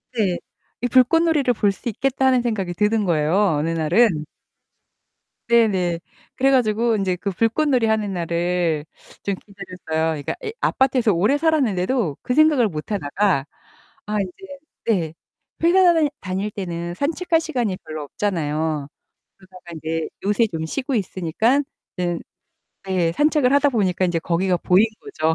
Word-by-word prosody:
네. 195 -6 +1 0.4
이 245 - +1
불꽃놀이를 275 +2 +3
볼 205 -3 +2
수 195 +5 -5
있겠다는 260 +2 +1
생각이 205 -7 -2
드는 210 +3 +1
거예요, 155 -1 +1 0.2
어느 155 +3 -1
날은. 165 +1 +2 1.2
네네. 190 -8 +3 0.4
그래 270 +1 +3
가지고 230 -2 +2
인제 190 -2 0
그 200 +3 -3
불꽃놀이 230 +4 +1
하는 215 -2 0
날을 170 -2 -1 0.4
좀 200 - -1
기다렸어요. 180 -5 -4
그러니까 - - -3
이 435 - -3
아파트에서 255 -5 +2
오래 205 +12 +2
살았는데도 250 - +1
그 250 - -2
생각을 300 -5 +4
못 155 0 -7
하다가 180 -3 0 0.6
아 210 0 -1
이제 280 - -8 0.3
네. 175 -8 0 0.5
회사 355 +1 +5
다닐 315 -3 +2
다닐 190 +2 -3
때는 175 -3 -5
산책할 325 - 0
시간이 245 - -2
별로 155 -1 -6
없잖아요. 155 -3 -2 0.5
그러다가 185 -1 -16
인제 160 0 -3 0.2
요새 210 +3 +3
좀 160 -1 -3
쉬고 260 - -3
있으니깐 210 - 0 0.4
응. 175 -2 -1 0.7
예 175 -3 +1
산책을 295 - +2
하다 285 +1 +4
보니까 190 -6 +1
인제 175 -1 0
거기가 180 +2 0
보인 185 +6 +4
거죠. 160 - -1
200 Hz, 315 characters per minute, -21 LUFS, 170-250 Hz, 1.2 s, 회사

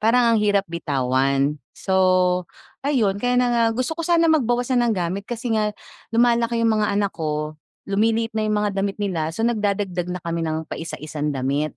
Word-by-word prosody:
Parang 235 +2 +4
ang 225 - +4
hirap 205 -1 +2
bitawan. 140 -3 0 0.2
So, 185 -1 +2 0.3
ayun 225 -9 +1
kaya 245 0 +1
na 250 0 +3
nga 235 -1 +3
gusto 255 +5 -1
ko 335 - -5
sana 335 -1 +3
magbawas 245 -3 +1
na 240 -1 +3
ng 225 - +2
gamit 180 +3 -2
kasi 240 0 -3
nga 210 -1 0 0.3
lumalaki 235 0 +2
yung 225 - +4
mga 210 - +1
anak 200 -1 0
ko, 150 -1 -3 0.3
lumiliit 225 +3 +1
na 215 -1 -1
yung 210 - +1
mga 205 - +1
damit 200 0 -2
nila 180 -7 -1
so, 225 +8 -3
nagdadagdag 200 -6 -1
na 180 0 -5
kami 170 0 -2
ng 160 0 -2
paisa-isang 155 -1 -5
damit. 140 +3 -1
200 Hz, 185 wpm, -22 LUFS, 165-235 Hz, 0.3 s, Parang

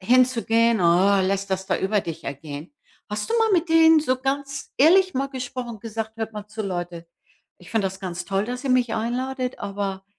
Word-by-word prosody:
hinzugehen, 230 0 +3
äh, 190 +3 +4
lässt 195 0 -1
das 190 0 -2
da - - +1
über 200 +2 +1
dich 165 -4 -7
ergehen. 145 - -7 0.4
Hast 210 - -4
du - - +1
mal 450 -1 +3
mit 340 -2 +2
denen 325 -1 +6
so 260 -4 0
ganz 275 0 -3
ehrlich 370 +5 +5
mal 270 +1 0
gesprochen, 250 -4 -6
gesagt: 225 0 -5
„Hört 225 0 -4
mal 210 -1 -7
zu 215 +1 -6
Leute. 175 -3 -5 0.5
Ich 180 - -15
finde 220 -4 +1
das 190 0 -6
ganz 180 -2 -5
toll, 195 +2 -1
dass 250 +3 -5
ihr 265 - 0
mich 245 -3 +2
einladet, 250 +3 -2
aber, 195 -1 -4
225 Hz, 195 wpm, -23 LUFS, 195-255 Hz, 0.5 s, denen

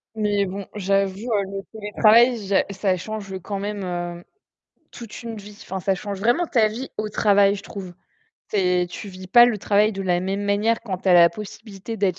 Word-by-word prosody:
Mais 205 -2 +1
bon, 195 +1 -6
j'avoue, 195 -1 0
heu, 200 -2 +2
le 195 0 -4
télétravail, 220 +3 +4
je 200 - 0 0.2
ça 190 -1 0
change 195 0 -6
quand 200 +2 -5
même, 205 0 -4
heu, 175 -1 -4 0.7
toute 235 0 -10
une 230 -1 -6
vie, 205 0 -11
enfin, 190 - -5
ça 190 +1 0
change 200 +1 -6
vraiment 240 - +2
ta 230 -8 +3
vie 235 +5 -6
au 215 0 -2
travail, 200 -1 +3
je 200 - -9
trouve. 185 -4 -8 0.6
Tu - - -3
es 180 -2 +2
tu 200 +4 -8
vis 185 -1 -10
pas 240 +4 +8
le 240 -3 +1
travail 210 +2 +2
de 195 -1 -5
la 180 -2 +1
même 195 +2 -2
manière 205 +3 +1
quand 195 -5 -5
tu 190 - -3
as 180 - +6
la 170 -1 +7
possibilité 210 +2 -8
d'être 190 -5 0
200 Hz, 205 wpm, -22 LUFS, 190-215 Hz, 0.7 s, pas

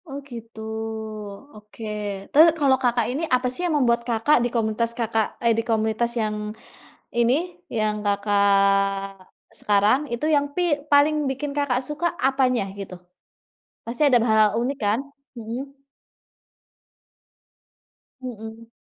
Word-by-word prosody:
Oh, 275 -2 -6
gitu. 230 -2 -10 0.9
Oke, 210 +1 -11 0.5
terus 305 +3 +8
kalau 270 -3 +4
Kakak 240 -2 +2
ini, 275 +5 -3
apa 250 0 0
sih 300 - -4
yang 320 - 0
membuat 235 -3 +2
Kakak 230 +6 +3
di 240 - 0
komunitas 230 0 0
Kakak, 225 -2 -1
eee, 235 -1 +3
di - - +2
komunitas 220 +1 0
yang, 215 -1 -1 0.8
ini, 235 +1 +3 0.4
yang 215 -2 -1
Kakak 195 -1 +1 0.3
sekarang, 205 +4 +3
itu 235 +6 -2
yang, 285 0 +1
pi - - +3 0.3
paling 290 +1 +5
bikin 280 +2 -4
Kakak 285 -4 +1
suka, 300 +4 -2
apanya 255 -4 +1
gitu? 190 -2 -7 0.9
Pasti 235 +5 -4
ada 255 -3 +5
be - - 0
hal-hal 215 -1 +4
unik 250 +4 -1
kan? 210 +2 +1 0.4
Mhm. 245 +5 -6 2.5
Mhm. 225 -2 -8
230 Hz, 130 wpm, -23 LUFS, 215-265 Hz, 2.5 s, terus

